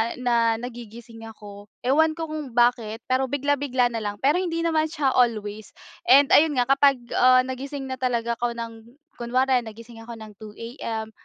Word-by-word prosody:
na 235 -2 +1
nagigising 230 -1 -10
ako, 205 -2 -12 0.2
ewan 315 +5 +2
ko 325 -2 -6
kung 290 -6 -6
bakit 235 -2 +1
pero 260 +1 0
bigla-bigla 280 -3 0
na 230 - -3
lang 205 -1 -4
pero 295 +6 +3
hindi 335 -2 -2
naman 315 -1 +1
siya 300 -4 -1
always 215 -4 -1 0.3
and 275 +2 +6
ayun 300 -2 +5
nga, 245 - +3
kapag 275 -3 +3 0.2
ah 255 0 +6
nagising 270 +2 -6
na 260 -1 -6
talaga 235 -2 -1
ako 240 -1 -2
ng 230 +1 -9 0.2
kunwari 255 +2 +1
nagising 230 0 -11
ako 230 +1 -9
ng 220 -1 -11
2 215 -1 -11 0.2
AM, 220 -1 -4
245 Hz, 170 wpm, -24 LUFS, 225-275 Hz, 0.3 s, and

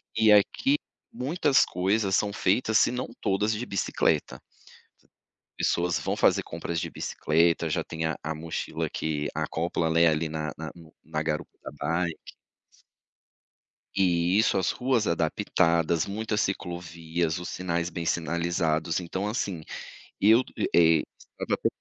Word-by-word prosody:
e 110 -1 +5
aqui 265 - +4 0.3
muitas 145 +1 +2
coisas 95 +2 +1
são 105 -1 +1
feitas, 110 +3 +2
se - - +4
não 125 +1 -3
todas, 100 +2 +1
de 120 +4 -3
bicicleta. 100 - 0 1.2
Pessoas 85 0 +1
vão - - -2
fazer - - +3
compras 85 -1 -4
de - - -4
bicicleta. 85 +1 +1
Já - - 0
tem 80 0 -5
a 80 - -1
a 80 +1 -3
mochila 80 +1 -4
que 75 -2 -2
acopla, 85 0 -1
né, 85 +1 +5
ali 80 0 0
na 75 -2 -3
na - - -5
no 80 -2 -15
na 75 0 -2
garupa 75 -1 -3
da - - -7
bike. 85 +2 -3 1.6
E 90 -1 +3
isso, 110 - +3
as 95 - +1
ruas 125 -4 +1
adaptadas, 85 -1 +1
muitas 105 +1 -2
ciclovias, 85 -2 -2
os 90 - -6
sinais 85 -2 -2
bem 85 0 -4
sinalizados. 85 -1 0
Então, 95 +3 -3
assim, 100 -7 -2 0.6
eu 110 +5 +6
e, - - -1
eh, 80 -2 +5 0.2
estava - - -4
com - - 0
85 Hz, 140 wpm, -27 LUFS, 80-100 Hz, 1.6 s, eu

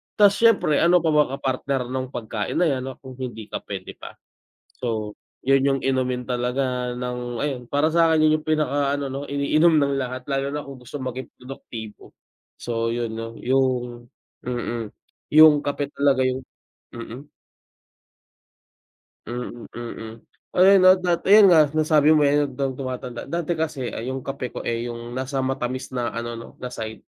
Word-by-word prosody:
Tas 205 -2 +6
siyempre 225 -10 +4
ano 175 +1 +5
pa 160 - +2
ba 150 -1 +4
ka - - -10
partner 130 -1 -1
nung 130 0 -2
pagkain 110 -3 -4
na - - +3
yan 130 -1 -3 0.2
kung 130 -1 -11
hindi 115 -4 -6
kape 95 -2 -5
'di - - -10
ba? - - -10 0.7
So 110 -4 -2 0.3
yun 135 0 +4
yung 135 0 +2
inumin 130 -2 0
talaga 125 0 -1
ng 125 -1 -4
ayun 140 -4 -2
para 155 +3 +1
sa 165 -1 +5
'kin 155 -1 +4
yun 155 - +4
yung - - -25
pinaka 145 -2 +1
ano 140 -2 -4
'no 135 - -4
iniinom 155 +4 +3
ng 140 -1 +2
lahat 130 0 -4
lalo 135 0 -1
na 150 +1 -4
kung 135 -2 -10
gusto 125 +4 -7
maging 130 -1 -5
produktibo. 115 -4 -10 0.4
So 115 -1 -2
yun 115 -1 -2
'no 115 0 -6
yung, 125 -2 0 0.4
mm, 120 -2 -3 0.5
yung 155 -2 +8
kape 145 0 -3
talaga 140 -2 +2
yung 130 0 -1 0.5
mm. 120 +3 -8 2.0
Mm, 120 0 -6
mm, 115 -2 -7 0.4
ayan 195 +2 +7
no 185 - +9
at 185 - -7
that, 175 -2 +1
ayun 200 0 +8
nga 160 -3 +7
nasabi 155 -1 +4
mo, 150 - +4
eh, 145 0 +3
habang 135 -1 -3
tumatanda 125 -2 -5
dati 170 -1 -2
kasi 145 -6 -2
ay 115 - -6
yung 130 0 -4
kape 135 -2 -5
ko, - - -5
eh, 115 0 -2
yung 120 0 -7
nasa 130 +1 -2
matamis 130 -1 -3
na 120 -2 -3
ano 115 0 -4
'no, 115 - -9
na 125 - -4
side. 110 -2 -7
130 Hz, 170 wpm, -23 LUFS, 120-145 Hz, 2.0 s, no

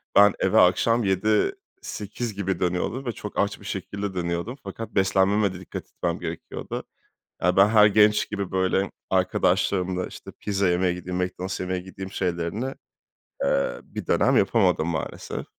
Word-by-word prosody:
Ben 100 0 +7
eve 95 - +3
akşam 115 +6 +4
19.00-20.00 110 - -1
gibi 95 -3 -2
dönüyordum 90 +9 -1
ve 120 - -1
çok 105 -2 -6
aç 100 0 0
bir - - -14
şekilde 100 +1 -4
dönüyordum 85 +7 -2
fakat 115 - -6
beslenmeme 95 +1 +3
de 90 - -8
dikkat 95 - -7
etmem - - -3
gerekiyordu. - - -5 0.6
Ya 90 +2 +2
ben 95 +1 +7
her 105 -2 +7
genç 105 0 +4
gibi 100 -3 -3
böyle 95 +1 +1 0.2
arkadaşlarımla, 90 0 +1
işte, - - -10
pizza 100 -2 0
yemeye 90 0 +2
gideyim, 90 0 -5
Mc 90 0 0
Donald's 95 +1 -3
yemeye 90 0 -2
gideyim 95 +1 -8
şeylerini, 95 +8 -2 0.7
eee, - - +1
bir - - -8
dönem - - +3
yapamadım - - +3
maalesef. - - -4
95 Hz, 150 wpm, -25 LUFS, 90-105 Hz, 0.7 s, Ben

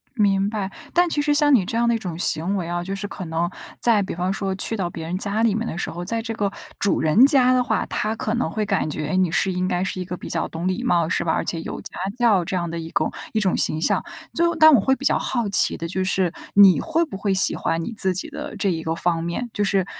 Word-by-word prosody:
明 200 -3 +2
白， 205 -3 -4 0.2
但 350 0 +3
其 295 -3 -1
实 295 0 +1
像 290 -1 +4
你 205 - +3
这 225 - -4
样 235 0 +2
的 235 - +2
一 230 - -1
种 175 -5 -6
行 180 +3 0
为 170 -3 -4
啊， 175 0 -3
就 190 +3 -5
是 195 +1 -4
可 185 - -8
能 165 +2 -1 0.3
在 225 -4 +3
比 195 - -5
方 180 +2 -2
说 195 -2 -3
去 215 +3 -3
到 185 -4 -2
别 165 -1 -7
人 180 - -3
家 205 +2 0
里 225 -3 +2
面 225 +2 -2
的 - - -5
时 - - -3
候， 175 +1 -6
在 230 +4 -2
这 225 0 -5
个 205 -3 -1 0.3
主 200 - +1
人 160 +11 +5
家 260 -3 +4
的 255 -1 +3
话， - - -1
他 215 +1 -2
可 215 0 -2
能 240 - -1
会 215 -2 -2
感 195 -5 0
觉 150 0 -4
你 185 -2 +1
是 190 +3 +1
应 185 0 -2
该 180 -1 -1
是 185 - -4
一 180 - -3
个 180 0 -6
比 - - -9
较 165 - 0
懂 165 +2 -5
礼 185 +6 -1
貌 175 -10 +1
是 - - -1
吧？ 160 - +1
而 - - -1
且 165 - -3
有 - - -6
家 - - -3 0.3
教 215 -7 +3
这 185 - -3
样 170 -1 -2
的 170 - -5
一 165 0 -7
种 - - -1 0.2
一 220 - 0
种 190 -3 +1
形 155 - 0
象。 - - +1 0.3
最 340 - +2
后 340 - 0
但 315 -2 +7
我 225 - +5
会 265 +7 +2
比 280 - -10
较 - - +3
好 235 -5 -2
奇 195 - +5
的 165 - -5
就 185 +2 -3
是， 185 -2 +1 0.2
你 200 -2 +7
会 330 +1 0
不 300 - -8
会 195 0 -1
喜 190 - +6
欢 165 0 -2
你 235 - -5
自 190 -3 +7
己 185 - -1
的 - - -7
这 195 - 0
一 165 -2 -3
个 160 0 -2
方 170 0 -1
面？ 170 +9 -4
就 205 - -2
是 195 -1 +1
195 Hz, 310 characters per minute, -22 LUFS, 175-225 Hz, 0.3 s, 但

